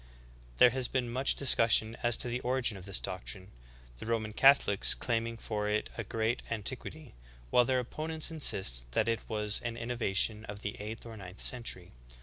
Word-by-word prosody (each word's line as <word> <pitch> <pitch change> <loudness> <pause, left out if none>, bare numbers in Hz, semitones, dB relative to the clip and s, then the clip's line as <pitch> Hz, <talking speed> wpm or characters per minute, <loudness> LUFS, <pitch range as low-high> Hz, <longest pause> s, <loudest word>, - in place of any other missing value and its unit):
There 125 - +7
has 130 0 -1
been 125 -3 -2
much 130 +3 +2
discussion 115 -4 +4
as 120 -1 +4
to - - +1
the 120 +1 -2
origin 125 -3 0
of 95 -2 -10
this 100 -1 -1
doctrine/ 95 +1 -5 0.5
the - - -8
Roman 110 -2 -2
Catholics 135 -6 +5
claiming 115 -1 -2
for 105 -2 -3
it 105 0 -1
a 115 - -4
great 110 +3 -2
antiquity, 130 +6 -5 0.4
while 125 - +5
their 130 0 +1
opponents 155 +6 -2
insist - - +1
that 110 - +1
it 115 -1 0
was 105 -2 0
an 120 -1 -4
innova 115 -4 -3
tion 110 +2 +1
of 100 -1 -8
the 105 +3 -4
eighth 110 +3 -7
or 115 -1 -9
ninth 95 -1 -11
century. 115 -8 -1
115 Hz, 180 wpm, -31 LUFS, 105-125 Hz, 0.5 s, There